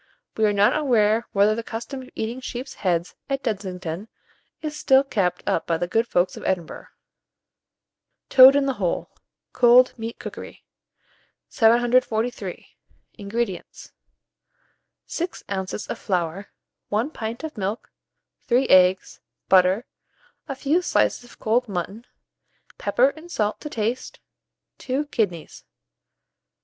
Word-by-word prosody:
We 220 - +2
are - - +2
not 205 0 +3
aware 230 -6 +2
whether 205 +2 +4
the 230 - -3
custom 235 +4 -6
of 255 - -12
eating 230 +4 -4
sheep's 255 +1 -6
heads 175 -2 -1 0.2
at 275 0 -2
Dudingston 190 -3 -4 0.6
is 305 -1 -4
still 275 -3 +4
kept 195 -10 -1
up 165 - 0
by 165 - +1
the 175 - -1
good 225 +6 +1
folks 180 -4 +1
of - - -9
Edinburgh. 175 -4 -3 1.4
TOAD 265 +1 +9
IN 285 -1 +3
THE 270 - 0
HOLE 175 -2 -1 0.4
(Cold 250 +1 +6
Meat 225 +1 -5
Cookery). - - -9 0.8
743. 240 0 +1 0.5
INGREDIENTS. 200 -2 -4 1.1
6 345 +1 -5
oz. 190 +1 -4
of - - -5
flour, 180 0 -2 0.4
1 225 +8 0
pint 230 0 -6
of 315 -1 -6
milk, 205 +1 -4 0.6
3 255 +2 +3
eggs, 185 0 +4 0.3
butter, 190 +4 +4 0.6
a 275 - -4
few 300 +6 +1
slices 355 - +1
of 245 - -17
cold 230 +2 0
mutton, 200 +5 -5 0.7
pepper 240 +6 +3
and 315 +4 -12
salt 215 -8 -1
to 300 - -6
taste, 230 0 -3 0.6
2 270 +3 -2
kidneys. 180 -8 -2
225 Hz, 125 wpm, -23 LUFS, 195-255 Hz, 1.4 s, TOAD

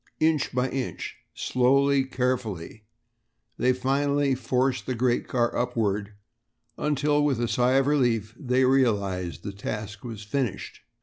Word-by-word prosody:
Inch 155 -2 +2
by 125 +1 0
inch, 130 -2 -4 0.2
slowly, 135 +2 +3
carefully, 120 -6 -3 0.7
they 125 - +4
finally 140 +2 +1
forced 130 +1 0
the 130 - -1
great 120 0 +1
car 120 -2 0
upward, 105 -4 -1 0.6
until 150 0 +1
with 140 -5 +1
a 120 - 0
sigh 125 +2 +2
of 135 0 +4
relief 120 -7 +1
they 130 0 +1
realized 100 - +1
that - - -4
the 100 - -16
task 105 -1 -5
was 115 -3 -7
finished. 120 +1 -3
125 Hz, 135 wpm, -26 LUFS, 110-135 Hz, 0.7 s, they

